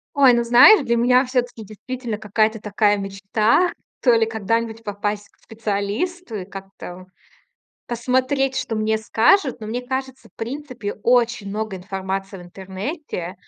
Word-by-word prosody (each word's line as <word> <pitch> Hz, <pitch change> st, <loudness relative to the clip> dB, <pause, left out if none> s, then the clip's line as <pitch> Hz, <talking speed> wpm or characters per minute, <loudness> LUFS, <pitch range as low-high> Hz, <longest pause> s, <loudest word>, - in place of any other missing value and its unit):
Ой, 275 Hz, -3 st, +6 dB
ну, 235 Hz, 0 st, +2 dB
знаешь, 250 Hz, -, +7 dB
для 235 Hz, 0 st, +2 dB
меня 250 Hz, +2 st, +4 dB
всё-таки 245 Hz, -3 st, -2 dB
действительно 225 Hz, +2 st, -6 dB
какая-то 215 Hz, +1 st, 0 dB
такая 205 Hz, 0 st, +1 dB
мечта, 200 Hz, -, +1 dB, 0.3 s
то 245 Hz, -3 st, +5 dB
ли 225 Hz, -1 st, +4 dB
когда-нибудь 225 Hz, +1 st, -2 dB
попасть 205 Hz, 0 st, -3 dB
к -, -, -34 dB
специалисту 225 Hz, -, -3 dB
и 185 Hz, -3 st, -5 dB
как-то, 195 Hz, -2 st, -9 dB
о, -, -, -14 dB, 0.8 s
посмотреть, 260 Hz, +3 st, 0 dB
что 225 Hz, -, -2 dB
мне 220 Hz, 0 st, 0 dB
скажут. 235 Hz, -, +2 dB
Но 215 Hz, -, -6 dB
мне 240 Hz, +3 st, -3 dB
кажется, 265 Hz, 0 st, -5 dB
в -, -, -40 dB
принципе, 250 Hz, -3 st, -5 dB
очень 235 Hz, -4 st, +2 dB
много 210 Hz, 0 st, -4 dB
информации 195 Hz, +1 st, -5 dB
в -, -, -10 dB
интернете, 190 Hz, -, -6 dB
225 Hz, 145 wpm, -21 LUFS, 205-250 Hz, 0.8 s, знаешь